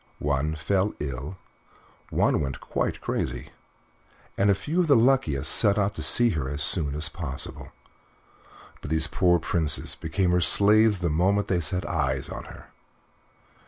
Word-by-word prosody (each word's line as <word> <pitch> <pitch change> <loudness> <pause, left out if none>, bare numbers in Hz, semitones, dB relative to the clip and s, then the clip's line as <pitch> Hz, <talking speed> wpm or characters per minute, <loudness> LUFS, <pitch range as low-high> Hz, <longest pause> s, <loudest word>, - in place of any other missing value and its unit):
One 75 +2 -1
fell 95 +6 0
ill, 70 +5 -5 0.7
one - - +1
went 70 -3 -4
quite - - -3
crazy, - - -3 0.8
and 100 +1 +2
a 100 - +4
few 155 - -3
of 175 - 0
the 145 - +5
luckiest 115 - +2
set 100 - +2
off 100 0 +1
to 80 - -7
see 120 +9 +3
her 70 -6 -3
as 70 +1 -3
soon 75 -3 -1
as 75 +1 -2
possible, 70 -3 -7 1.1
but - - -7
these 80 0 0
poor 90 +3 +2
princes 80 -2 +1
became 90 +3 -1
her 90 0 +2
slaves 105 +3 +4
the 85 - 0
moment 95 +6 +1
they 90 -2 +1
set 90 +5 -2
eyes 70 -5 -1
on - - -7
her. - - -13
85 Hz, 160 wpm, -25 LUFS, 75-100 Hz, 1.1 s, the